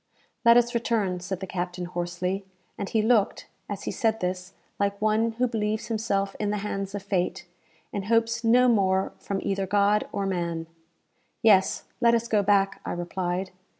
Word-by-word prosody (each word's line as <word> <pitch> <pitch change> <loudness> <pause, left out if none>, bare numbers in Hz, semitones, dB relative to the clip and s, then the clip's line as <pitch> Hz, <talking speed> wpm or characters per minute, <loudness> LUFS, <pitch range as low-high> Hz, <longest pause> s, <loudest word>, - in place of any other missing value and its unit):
"Let 235 0 +7
us 240 0 +3
return," 220 -6 0
said 180 +1 -5
the - - -3
captain, 180 -1 -4
hoarsely, 175 +2 -3 0.3
and 200 - -4
he 220 -1 +1
looked, 220 -3 +2 0.2
as 205 -1 -5
he - - -2
said 225 -1 0
this, 180 +1 -3 0.3
like 200 0 0
one 215 +2 +2
who 245 +3 +1
believes 215 -1 -2
himself 200 -3 -1
in 210 - 0
the 210 - 0
hands 195 -1 -3
of 200 - -5
fate, 185 -2 -1 0.5
and 200 -1 -3
hopes 230 +1 +1
no 245 +2 +5
more 190 -5 +2
from 200 -1 -3
either 195 -1 -1
God 205 +2 +2
or 200 - -2
man. 170 -3 -2 0.8
"Yes, 200 -4 +4 0.2
let 235 -1 +5
us 235 0 -1
go 215 -3 +3
back," 195 -1 +2
I - - -3
replied. 175 +1 -3
200 Hz, 175 wpm, -26 LUFS, 185-220 Hz, 0.8 s, Let